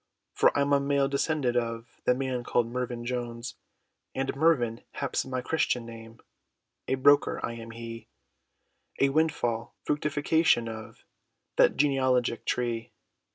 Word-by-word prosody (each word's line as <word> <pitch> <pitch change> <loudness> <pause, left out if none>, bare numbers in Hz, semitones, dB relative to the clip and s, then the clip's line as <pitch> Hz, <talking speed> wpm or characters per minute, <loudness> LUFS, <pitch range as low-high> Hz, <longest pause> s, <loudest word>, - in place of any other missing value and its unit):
For - - +5
I'm 140 0 +2
a 140 - +5
male 140 0 +2
descendant, 140 -2 0
of 115 -1 -3
The 125 - +4
man, 130 -2 -2
called 120 0 +1
Mervyn 120 0 -4
Jones! 120 0 -4 0.6
And 135 0 -1
Mervyn, 135 -7 +2
haps 140 - -2
my 130 -1 -3
christian 125 -4 0
name, 115 0 -11 0.7
A - - +1
broker, 145 +2 +4
I 115 - -4
am 115 0 -8
he, 115 -1 -8 0.9
A 140 - +4
windfall 135 -6 0
fructifaction, 150 -3 +2
of 110 -1 -9 0.5
That - - +5
genealogic 130 -4 +2
tree. 120 -2 -2
125 Hz, 130 wpm, -28 LUFS, 115-140 Hz, 0.9 s, For